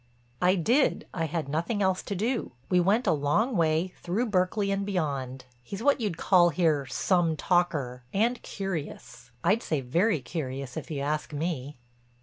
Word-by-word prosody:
"I 180 +1 +4
did; 235 - +2
I 165 -2 -1
had 160 -1 -3
nothing 170 +9 -1
else 190 -1 +1
to 200 - -4
do. 225 - -1 0.2
We 180 - +5
went 205 +8 +2
a - - +4
long 160 - +1
way, 165 +1 +1
through 215 +6 -1
Berkeley 200 +2 +1
and 195 0 0
beyond. 140 -9 -2 0.2
He's 195 - -7
what 285 -2 +3
you'd 200 -7 -1
call 175 -2 +5
here 155 -4 +1
'some 170 0 +1
talker' 150 -9 0
and 235 +5 +1
curious—I'd 165 - -3
say 155 -9 -1
very 170 - +1
curious 135 -3 -5
if - - -6
you 145 -3 -3
asked 150 +2 -2
me." 150 -3 -3
175 Hz, 160 wpm, -28 LUFS, 145-200 Hz, 0.2 s, We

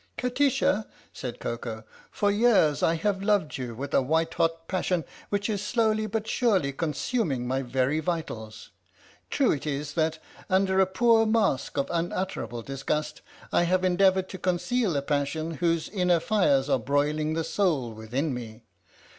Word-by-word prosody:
" - - -44
Kati 255 +3 +2
sha," 215 -4 +1 0.3
said 125 -3 -6
Koko, 115 -1 -5
" - - -23
for 205 0 +1
years 205 -9 +3
I 165 - +3
have 195 +3 -1
loved 200 -9 +1
you 120 -3 -5
with 140 +4 -6
a - - +5
white 160 +4 0
hot 165 0 0
passion 180 -3 -1 0.2
which 205 0 -1
is 205 -3 -2
slowly 215 0 +1
but 220 +1 -3
surely 195 - +1
consuming 150 - -1
my 130 +2 0
very 130 +4 0
vitals! 155 -10 -5 0.6
True 275 -4 +2
it 150 0 -3
is 145 0 -3
that, 160 0 0 0.3
under 190 0 +2
a 190 - +5
poor 225 +3 +4
mask 215 - +1
of 140 - +1
unutterable 170 - -3
disgust, 150 +3 -3 0.3
I - - +4
have 185 +1 +1
endeavoured 185 +1 +3
to 185 - -7
conceal 180 - 0
a 140 - -1
passion 145 +3 -1
whose 165 -2 +1
inner 180 -4 +2
fires 150 -9 +2
are 135 -3 +2
broiling 150 +5 0
the 165 - 0
soul 155 - 0
within 125 +7 -2
me! 115 -2 -8
165 Hz, 165 wpm, -27 LUFS, 140-195 Hz, 0.6 s, a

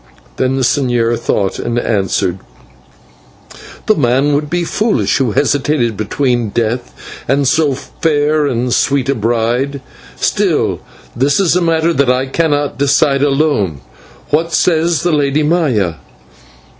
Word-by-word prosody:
Now 130 - +2
the 135 +1 -1
señor 120 -3 +1
thought 100 -2 -1
and 120 - -3
answered: 95 -5 -1 1.5
"The 215 - +4
man 140 - +1
would 145 +1 -1
be 175 +1 -1
foolish 215 +5 0
who 130 -7 0
hesitated 140 -4 0
between 120 +2 -1
death 120 +3 -2 0.4
and 140 0 +1
so 150 -2 +2
fair 150 +1 0
and 125 -2 -1
sweet 140 -2 +1
a - - +3
bride. 120 +4 -1 0.4
Still, - - 0 0.4
this 140 +6 +1
is 185 -3 +2
a 180 - +2
matter 165 0 +1
that 140 -5 +1
I 125 +1 +1
cannot 145 -2 -1
decide 140 0 +2
alone. 135 - 0 0.5
What 165 +2 0
says 165 -1 +1
the 175 - +1
Lady 145 0 +1
Maya?" 130 - 0
140 Hz, 130 wpm, -14 LUFS, 120-150 Hz, 1.5 s, The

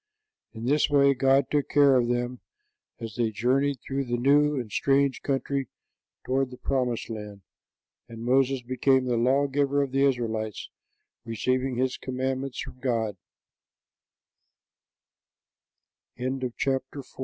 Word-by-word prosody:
In 115 0 -7
this 145 +3 +2
way 140 -1 +5
God 135 +1 +2
took 145 -2 0
care 140 -2 +5
of 120 -2 +3
them 120 +1 -2 0.6
as 115 -2 -7
they 115 -2 +1
journeyed 130 +5 0
through 135 0 -3
the 120 -1 -1
new 145 +3 +3
and 115 -4 -6
strange 140 +4 +1
country 135 -1 -1 0.6
toward 135 0 0
the 125 - -11
promised 125 -3 -1
land, 105 -3 -8 0.7
and 115 0 -8
Moses 130 0 +2
became 130 +1 +2
the 125 -1 0
law 130 +5 +3
giver 140 0 +1
of 135 - -5
the 135 +1 +2
Israelites, 110 -5 -1 0.5
receiving 130 +3 -1
his 130 +1 0
commandme 130 +1 -2
130 Hz, 115 wpm, -26 LUFS, 120-140 Hz, 0.7 s, way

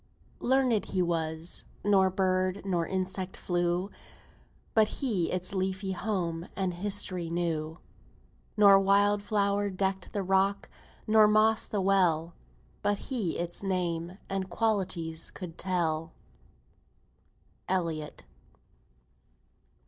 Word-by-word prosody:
Learned 255 -4 +2
he 185 -1 0
was; 165 -1 -2 0.2
nor 195 -2 +4
bird, 185 0 0
nor 175 -4 0
insect 190 0 -3
flew, 175 +2 -1 0.8
But 220 -1 +5
he 215 - 0
its 185 +2 -1
leafy 190 0 -2
home 180 -4 -2
and 190 -2 -1
history 185 -2 -2
knew; 165 -2 -2 0.8
Nor 200 -2 +8
wild 200 +1 +3
flower 205 -1 +1
decked 190 -1 -2
the 200 - -2
rock, 195 +1 +1 0.3
nor 215 0 +6
moss 215 +1 +3
the 205 - -1
well, 175 -4 +2 0.5
But 205 0 +1
he 220 -7 -2
its 175 0 -4
name 180 -2 -2
and 190 -1 -3
qualities 180 -6 -1
could 175 -4 -8
tell. 165 -4 -1 1.6
ELLIOTT. 165 -5 -2
190 Hz, 105 wpm, -29 LUFS, 175-200 Hz, 1.6 s, Nor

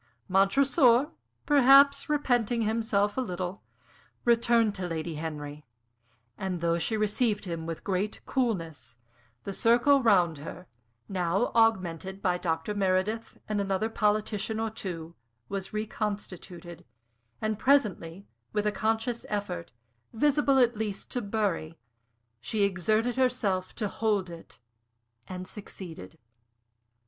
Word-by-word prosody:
Montresor, 250 - +4 0.3
perhaps 280 0 +6
repenting 245 -6 +1
himself 215 -1 0
a - - +2
little, 185 -3 -4 0.6
returned 235 -2 +3
to 185 -3 -4
Lady 165 0 -3
Henry; 150 -1 -6 0.8
and 185 -2 -2
though 170 0 +1
she 220 +6 -1
received 210 0 0
him 165 -2 -5
with 165 -1 -5
great 195 +2 -2
coolness, 165 - -2 0.5
the 200 - -5
circle 245 +7 +4
round 180 - +3
her, 165 +4 -8 0.4
now 185 +3 0
augmented 190 -4 +1
by 180 -2 0
Dr. 165 +3 -2
Meredith, 200 +3 0
and 210 -1 0
another 195 +2 -1
politician 215 0 0
or 225 0 -1
two, 170 -6 -6 0.4
was 195 -1 -4
reconstituted; 190 -5 -5 0.6
and 215 -1 -2
presently, 205 -10 +1 0.3
with 210 -1 0
a 210 - +2
conscious 225 +3 -1
effort, 185 -5 -4 0.4
visible 280 +2 +3
at 245 -2 +4
least 210 -2 -4
to 245 - -1
Bury, 200 -7 -2 0.6
she 205 - -1
exerted 215 +6 +1
herself 215 -8 0
to 210 - -2
hold 200 -4 -1
it, 165 -1 -12 0.7
and 185 0 -6
succeeded. 170 - -10
205 Hz, 115 wpm, -28 LUFS, 180-225 Hz, 0.8 s, perhaps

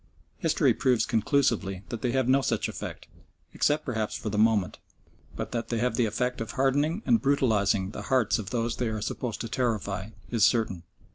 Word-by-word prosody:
History - - +3
proves 125 -3 +2
conclusively 110 -6 +1
that 120 - -5
they 125 - 0
have 130 -1 +1
no 135 +1 +4
such - - 0
effect, - - -7 0.5
except 150 +1 +1
perhaps 110 -5 -2
for 110 - -4
the 105 - -2
moment, 110 -4 +2 0.6
but - - -5
that 115 -1 -3
they 115 - -1
have 125 +2 +1
the 115 -1 +2
effect 125 +3 -2
of 115 - -5
hardening 145 - +1
and 230 -2 +3
brutalising 105 -8 +2
the - - -6
hearts 125 -4 +2
of 100 -3 -5
those 115 0 -1
they 125 - -1
are 110 -1 -2
supposed 110 +1 -4
to 115 - -3
terrify 105 -5 -2 0.2
is 115 -3 +2
certain. 110 -8 +2
115 Hz, 190 wpm, -27 LUFS, 105-130 Hz, 0.6 s, no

